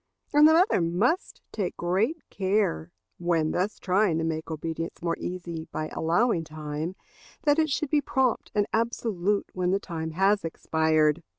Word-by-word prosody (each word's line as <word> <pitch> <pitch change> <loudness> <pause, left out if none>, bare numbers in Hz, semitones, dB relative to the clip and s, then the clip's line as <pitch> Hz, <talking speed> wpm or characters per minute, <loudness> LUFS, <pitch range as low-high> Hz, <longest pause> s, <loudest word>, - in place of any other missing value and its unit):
And 295 +1 +8
the 315 - +6
mother 355 - +4
must 195 - 0
take 200 -5 -3
great 195 - +1
care, 185 - 0 0.3
when 165 -3 +1
thus 190 +4 -1
trying 185 -2 +2
to 165 - -1
make 160 0 -3
obedience 165 +1 -4
more 170 -1 0
easy 170 -3 -5
by 155 0 -3
allowing 170 +3 +1
time, 155 +2 -5 0.5
that 295 0 +3
it 315 -1 +2
should 290 0 -1
be 300 -2 +3
prompt 265 -3 0
and 205 -1 +3
absolute 210 -4 0
when 180 -1 0
the 195 +2 +2
time 160 -4 -5
has 195 +4 +3
expired. 160 -1 +1
180 Hz, 160 wpm, -27 LUFS, 160-220 Hz, 0.5 s, And